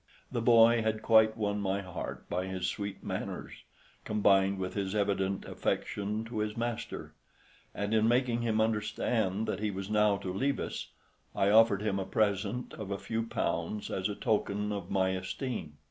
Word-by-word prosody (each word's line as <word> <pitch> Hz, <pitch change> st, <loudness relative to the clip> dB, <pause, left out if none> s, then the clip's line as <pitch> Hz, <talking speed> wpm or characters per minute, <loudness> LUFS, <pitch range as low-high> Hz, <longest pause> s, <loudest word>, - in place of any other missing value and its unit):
The 120 Hz, -3 st, -1 dB
boy 115 Hz, 0 st, +6 dB
had 110 Hz, 0 st, -1 dB
quite 110 Hz, -1 st, +5 dB
won 105 Hz, -1 st, -1 dB
my 100 Hz, 0 st, 0 dB
heart 90 Hz, -2 st, -6 dB
by 90 Hz, +1 st, -2 dB
his 95 Hz, -1 st, -3 dB
sweet 100 Hz, -1 st, -4 dB
manners, -, -, -4 dB, 0.5 s
combined 100 Hz, -2 st, +3 dB
with 95 Hz, -1 st, -3 dB
his 100 Hz, 0 st, -2 dB
evident 100 Hz, -2 st, 0 dB
affection 105 Hz, +2 st, -2 dB
to 115 Hz, -1 st, -4 dB
his 105 Hz, +1 st, -2 dB
master, 120 Hz, 0 st, -4 dB, 0.6 s
and 100 Hz, +1 st, -2 dB
in 110 Hz, 0 st, +4 dB
making 120 Hz, 0 st, +2 dB
him 110 Hz, -2 st, +1 dB
understand 110 Hz, -1 st, 0 dB
that -, -, -2 dB
he 105 Hz, 0 st, 0 dB
was 95 Hz, 0 st, -5 dB
now 105 Hz, -1 st, +4 dB
to 95 Hz, -2 st, -5 dB
leave 135 Hz, +7 st, 0 dB
us, -, -, -4 dB, 0.5 s
I 100 Hz, +1 st, +3 dB
offered 110 Hz, -2 st, +5 dB
him 100 Hz, -2 st, 0 dB
a 95 Hz, -, -2 dB
present 105 Hz, +4 st, 0 dB
of 105 Hz, -3 st, -7 dB
a 100 Hz, -, -2 dB
few 115 Hz, +3 st, -2 dB
pounds 100 Hz, +1 st, -2 dB
as 95 Hz, +2 st, -1 dB
a 105 Hz, -, -3 dB
token 105 Hz, -1 st, 0 dB
of 100 Hz, -3 st, -4 dB
my 95 Hz, -1 st, +2 dB
esteem. 95 Hz, -, -4 dB
105 Hz, 175 wpm, -31 LUFS, 95-110 Hz, 0.6 s, boy